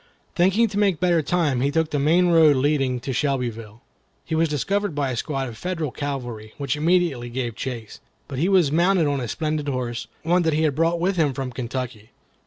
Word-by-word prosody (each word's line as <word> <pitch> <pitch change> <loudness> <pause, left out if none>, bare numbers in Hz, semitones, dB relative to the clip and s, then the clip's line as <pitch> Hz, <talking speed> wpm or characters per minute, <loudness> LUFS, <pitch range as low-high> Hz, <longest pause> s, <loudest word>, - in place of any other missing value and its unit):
Thinking 195 +6 +3
to 205 0 -2
make 195 -6 +2
better 175 -2 +3
time, 150 -4 0
he 140 - +2
took 160 +1 0
the 145 - 0
main 170 +5 +3
road 160 -4 +6
leading 135 -2 +1
to 130 +1 -4
Shelbyville. 120 -4 -2 0.4
He 165 - -5
was 160 0 +2
discovered 195 +5 -1
by 140 -2 0
a - - -3
squad 135 +2 -2
of 115 -2 -9
Federal 165 -6 -3
cavalry, 120 -7 -5
which 140 -1 -1
immediately 155 -6 +1
gave 120 -2 -3
chase. 120 -5 -6 0.3
But 135 -2 -5
he 175 +6 +2
was 180 -7 +4
mounted 175 +2 +3
on 145 -1 0
a 120 - -3
splendid 155 +2 -2
horse, 125 -3 -3 0.2
one 175 +3 +3
that 160 -2 +1
he 155 +2 +1
had 155 -3 +2
brought 165 +4 +1
with 185 +2 0
him 145 -5 +2
from 130 -1 -4
Kentucky. 120 -2 -5
145 Hz, 205 wpm, -23 LUFS, 130-170 Hz, 0.4 s, road